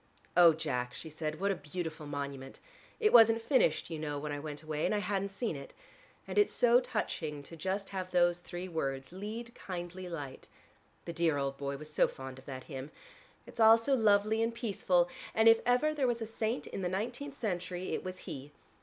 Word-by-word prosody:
"Oh, 170 -2 +8
Jack," 125 -5 -2
she 160 - -7
said, 155 0 -4
"what 200 +1 +1
a - - 0 0.2
beautiful 160 -4 -4
monument: 140 -2 -5 0.4
it 430 -2 +3
wasn't 225 -1 +8
finished, 245 - +2
you 160 - -3
know, 150 -1 -3
when 150 +1 -4
I 145 - -3
went 150 0 -7
away 155 -1 -3
and - - +2
I - - +2
hadn't 200 0 -1
seen 200 -2 -3
it. 140 0 -9 0.5
And - - +1
it's 415 - +4
so 240 0 +5
touching 150 - -3
to - - -12
have - - -17
just 190 +4 -2 0.2
those 175 -1 +3
three 175 +1 -6
words, 135 -5 -3
'Lead, 220 +5 -6
kindly 180 -1 -6
Light': 145 -6 -7 0.6
the 170 - -5
dear 165 -3 +2
old 140 -1 -1
boy 140 0 -3
was 150 +1 -11
so - - +4
fond 130 0 -8
of 130 - -18
that 130 -2 -6
hymn. 135 -1 -7 0.6
It's - - -13
all 225 0 +9
so 230 +5 0
lovely 215 -2 +4
and 230 0 0
peaceful, 190 -6 +2 0.3
and 220 +1 +5
if 225 0 +8
ever 250 +5 +3
there 280 -4 +1
was 240 -1 0
a - - -3
saint 225 +2 -2
in - - -5
the 180 - 0
nineteenth 245 +9 -4
century, 180 -3 -3
it - - -2
was 185 0 -5
he. 140 +2 -7
180 Hz, 205 wpm, -32 LUFS, 150-220 Hz, 0.6 s, all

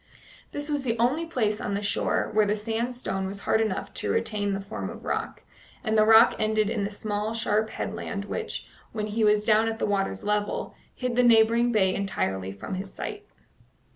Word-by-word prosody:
This 290 0 -5
was 290 -2 0
the 235 -3 -1
only 275 +9 +1
place 220 -9 0
on 200 - -2
the 205 - -2
shore 205 - 0
where 215 0 +4
the 210 - +2
sandstone 225 -3 -2
was 200 +1 -6
hard 220 - +2
enough 215 -4 -2
to - - -2
retain 210 - 0
the 195 - -2
form 200 +2 -5
of - - -10
rock, - - -3 0.4
and 220 -2 0
the 215 - +6
rock 225 +2 +8
ended 215 -1 +1
in 210 -3 -1
the 200 - -1
small, 210 +1 -3
sharp 220 -1 +1
headland 200 -2 -4
which, 445 - -4 0.3
when 215 -2 -2
he 215 +1 -1
was 210 0 +4
down 220 0 +4
at 225 0 -2
the - - 0
water's 195 - -1
level, 210 0 -1 0.2
hid 250 -2 -2
the 250 - +5
neighbouring 235 0 +5
bay 190 -4 +3
entirely 95 - -2
from 100 - -7
his 190 +1 -5
sight. 415 0 -6
215 Hz, 200 wpm, -26 LUFS, 205-230 Hz, 0.4 s, rock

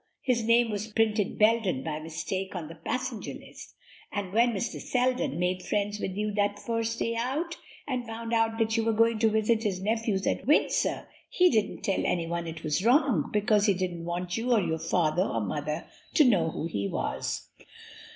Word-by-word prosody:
His 250 -3 +2
name 230 0 +4
was 210 +1 -3
printed 215 -2 +1
Belden 215 - +3
by 155 -1 -3
mistake 185 +5 -4
on 165 -4 -5
the - - -8
passenger 235 +7 -4
list, - - -12 0.4
and 195 -2 -4
when 235 +2 +4
Mr. 225 +2 -3
Selden 250 - 0
made 180 +1 0
friends 205 +2 -1
with 190 - -3
you 210 0 -1
that 205 0 +1
first 230 +1 -2
day 230 - -1
out, 285 +9 -2 0.3
and 250 -4 -2
found 230 +1 -5
out 225 0 +2
that 225 -1 +1
you 225 - +2
were 225 0 +1
going 230 0 +3
to 225 0 +4
visit 220 +1 +2
his 200 -5 -1
nephews 215 -1 0
at - - -1
Windsor, 300 - +2 0.2
he 360 0 +4
didn't 215 -4 0
tell 195 - 0
anyone 170 0 -1
it 160 0 -7
was 155 +4 0
wrong, 245 - +3
because 210 0 +3
he 200 - +4
didn't 175 -2 -3
want 175 +1 -3
you 240 +2 -1
or 235 - +5
your 160 -3 -1
father 165 +1 +1
or 115 -11 0
mother 150 - -3 0.3
to 305 - +7
know 185 -10 +3
who 160 - -4
he 100 -12 -2
was.'" - - -3
210 Hz, 190 wpm, -28 LUFS, 175-230 Hz, 0.4 s, to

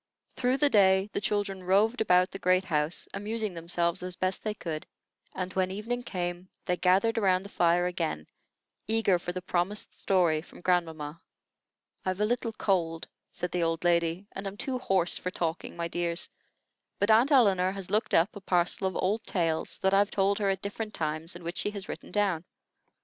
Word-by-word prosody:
Through 250 +1 +1
the 290 0 +3
day 190 0 +4
the - - -1
children 200 -1 -1
roved 210 +6 +3
about 180 -3 +4
the 195 - -7
great 185 +1 +3
house, 150 -1 0
amusing 215 0 -3
themselves 170 0 -1
as 180 0 -5
best 185 +1 -1
they 215 -1 -2
could; 160 -5 -5 0.5
and, 185 0 -3
when 185 -1 +1
evening 220 +6 -3
came, 180 -4 -4 0.2
they 180 - +1
gathered 190 +6 +3
around 190 -3 +2
the 200 - -9
fire 175 -1 +3
again, 165 - -2 0.6
eager 220 -4 +2
for 175 - -4
the 180 0 -5
promised 185 +3 -1
story 175 -5 +3
from 170 - -15
grandmamma. 165 -4 -1 0.8
"I've 185 +1 -2
a 210 - +3
little 235 0 -1
cold," 165 -6 0 0.2
said 180 -1 -4
the 180 - 0
old 165 0 0
lady, 170 +1 +2
"and 195 +1 -5
am 195 +1 -6
too 255 +3 -1
hoarse 190 -7 +1
for 180 - -3
talking, 170 -2 -3
my 170 0 -1
dears; 170 0 -2 0.7
but 205 +2 +2
Aunt 230 +5 +5
Elinor 195 -8 +4
has 195 -2 -7
looked 215 +2 +1
up 170 +6 +3
a 205 - -8
parcel 180 +1 +1
of 185 - -4
old 210 +4 0
tales 165 -4 -1
that 190 0 +3
I've 200 +1 +4
told 200 +1 +1
her 200 -2 +1
at 190 -1 -1
different 210 +1 -4
times 155 +2 -3
and 175 -1 -10
which 170 +1 -4
she - - 0
has 200 -2 -7
written - - -7
down. 195 -5 +1
185 Hz, 190 wpm, -29 LUFS, 175-205 Hz, 0.8 s, Aunt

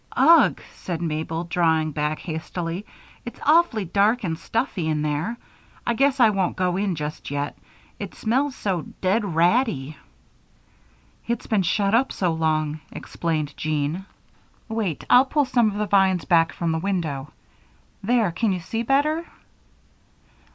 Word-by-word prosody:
"Ugh!" 335 0 +6
said 175 -3 -5
Mabel, 160 0 -2
drawing 160 -3 +1
back 150 +1 -1
hastily. 165 +3 -5 0.4
"It's 240 - -9
awfully 300 - +4
dark 205 +7 +2
and 165 -4 -1
stuffy 190 -2 -2
in 155 -1 0
there. 155 +10 -2 0.5
I 235 - +1
guess 275 +2 +2
I 230 -3 +6
won't 195 -3 0
go 180 -1 0
in 195 -2 0
just 150 0 -5
yet 145 +1 -3 0.4
it - - -6
smells 265 +5 0
so 190 -5 -1 0.2
dead 195 +4 +2
ratty." 175 - +1 1.3
"It's 235 -1 -2
been 215 -3 +1
shut 200 +3 +1
up 250 +4 +3
so 180 -3 0
long," 155 -1 0
explained 155 -3 -3
Jean. 155 +5 -2 0.6
"Wait. 220 -8 -2
I'll 250 - +7
pull 290 +1 +1
some 240 -4 +3
of 205 - -6
the 210 - 0
vines 190 -3 +3
back 165 -2 +3
from 170 -1 -2
this 160 0 -1
window. 160 -7 -2 0.7
There! 225 -2 +2
Can 205 +5 0
you 180 - -2
see 225 +6 -3
better?" 290 +7 +1
185 Hz, 145 wpm, -23 LUFS, 160-225 Hz, 1.3 s, I'll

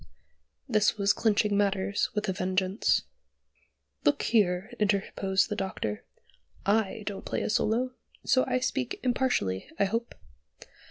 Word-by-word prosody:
This 215 +1 +2
was 200 -1 +3
clinching 210 -2 +2
matters 200 0 +1
with 210 0 -1
a 190 - 0
vengeance. 185 +2 +1 1.0
"Look 145 0 +2
here," 200 -1 +1
interposed 195 -2 +1
the 210 - -2
Doctor. 150 - -3 0.6
"I 210 0 +1
don't 200 -2 -5
play - - -2
a - - -1
solo, 235 +4 +1 0.3
so 255 - +4
I 255 - 0
speak 255 -1 -2
impartially, 245 - 0
I 200 - +3
hope. 230 +4 -2
205 Hz, 125 wpm, -28 LUFS, 190-225 Hz, 1.0 s, so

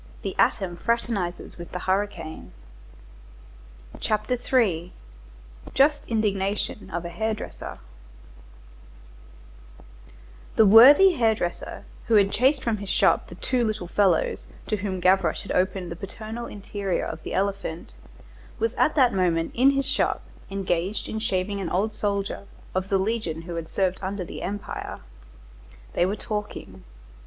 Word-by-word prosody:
Then - - -2
he - - -10
directed 195 - +2
his 175 -1 -10
course 235 0 +2
towards 180 -7 -4 0.3
l'Orme 200 +2 +2
Saint - - -20
Gervais. 160 - -9 1.5
CHAPTER 215 +2 0
III—JUST 170 - -1
INDIGNATION 205 -2 -1
OF 170 +1 -4
A - - -3
HAIR 220 +6 -1
DRESSER - - -8 2.8
The 220 - +6
worthy 265 - +9
hair 225 -2 +3
dresser 175 -4 -4 0.2
who 230 - +4
had 200 -1 +5
chased 265 +3 +2
from 230 -3 0
his 200 -1 -6
shop - - +3
the - - -10
two 250 -2 0
little 215 -5 -2
fellows 185 -3 +1 0.2
to 215 - -1
whom 190 -2 -3
Gavroche 180 -2 +2
had - - -6
opened 185 -1 0
the - - -4
paternal 220 +5 -7
interior 200 -1 -3
of 160 - -6
the - - -5
elephant 195 -4 -2 0.6
was 455 - 0
at - - +2
that 255 -5 +4
moment 170 -3 +1
in 260 +3 +5
his 275 -1 +1
shop - - +1 0.3
engaged 195 0 -1
in 220 - -3
shaving 200 -2 -1
an 180 - -3
old 205 +6 0
soldier 200 -1 -2 0.3
of 185 +1 -2
the 195 - +3
legion 190 -5 -2
who 170 0 -6
had 165 -1 -4
served 190 0 0
under 190 -1 -3
the - - -8
Empire. 205 +1 -5 0.9
They 175 - +2
were 200 - -1
talking. 210 - -6
195 Hz, 145 wpm, -25 LUFS, 175-220 Hz, 2.8 s, worthy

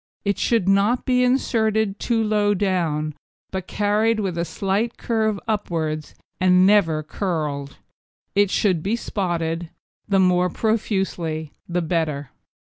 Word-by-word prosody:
It 200 0 0
should 230 -6 +1
not 200 +5 +3
be 250 -1 +3
inserted 220 -5 +1
too 230 -2 +1
low 210 -1 +2
down, 165 -6 0 0.4
but 190 -1 -4
carried 215 +2 +1
with 190 -4 -2
a 170 - -1
slight 200 +6 -1
curve 220 -3 0
upwards, 160 -8 -2 0.2
and 185 0 +5
never 175 -7 +3
curled. 150 -5 -3 0.6
It 205 0 +3
should 185 -5 +1
be 200 +7 0
spotted, 170 -6 -2 0.4
the 195 - +3
more 180 -1 +3
profusely 190 -8 -1 0.2
the 175 0 0
better. 155 -4 -1
190 Hz, 130 wpm, -22 LUFS, 165-215 Hz, 0.6 s, and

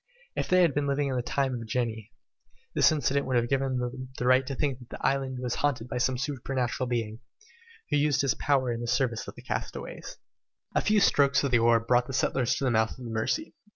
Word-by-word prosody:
If - - -1
they 185 0 +5
had 165 -5 +3
been 145 0 0
living 140 0 0
in 130 - -2
the 125 - 0
time 135 +2 -1
of 115 -2 -5
genii, 110 -2 -2 0.6
this - - +5
incident 140 -2 0
would 130 - 0
have 120 0 +2
given 135 -1 0
them 125 +1 -4
the 125 - -2
right 130 +1 +4
to 135 - -3
think 135 -2 -1
that 125 - -14
the - - -6
island 135 -1 0
was 125 -1 -2
haunted 125 -5 0
by 125 - -3
some 125 +1 +1
supernatural 130 -2 -2
being, 115 -2 -2 0.7
who - - +3
used 145 0 +2
his 140 -2 +2
power 135 -4 +1
in 115 0 -3
the 120 - -4
service 120 -1 0
of - - -8
the - - -12
castaways! - - -5 0.6
A - - +2
few 210 0 +3
strokes 140 -8 +4
of 140 - 0
the 120 - +5
oar 115 0 +4
brought 120 +2 +2
the 135 - -6
settlers 130 -1 +1
to - - -4
the 130 - +2
mouth 110 +1 +1
of 125 - -9
the 115 - -6
Mercy. 115 - -1
130 Hz, 235 wpm, -28 LUFS, 120-140 Hz, 0.7 s, they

